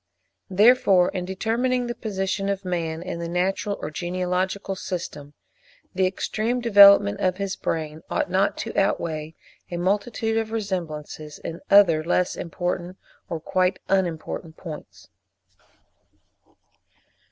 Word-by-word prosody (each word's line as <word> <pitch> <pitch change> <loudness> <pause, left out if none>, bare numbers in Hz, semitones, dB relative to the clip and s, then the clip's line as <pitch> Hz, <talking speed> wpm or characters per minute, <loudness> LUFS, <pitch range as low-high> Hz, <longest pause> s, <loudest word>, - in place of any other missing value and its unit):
Therefore 195 -2 +5
in 180 -2 -4
determining 235 +6 0
the 240 - -3
position 195 -3 -2
of 195 -1 -2
man 165 -2 -2
in 180 -2 -5
the 170 0 -4
natural 190 +3 -1
or 150 - -5
genealogical 185 +3 -2
system, 150 -6 -6 0.6
the 185 0 +2
extreme 220 +5 -1
development 200 - +7
of 185 -1 +1
his 195 -1 -2
brain 155 -1 -3
ought - - 0
not 190 +2 +1
to - - -5
outweigh 160 -5 -1 0.3
a 175 - -4
multitude 210 +5 0
of 220 -1 -4
resemblances 160 -8 -4
in 165 - -7
other 175 -6 +6
less 180 +2 +1
important 175 +1 -4 0.3
or 165 - -3
quite 185 +3 +1
unimportant 165 -3 -1
points. 155 -4 -10
185 Hz, 120 wpm, -24 LUFS, 170-200 Hz, 0.6 s, development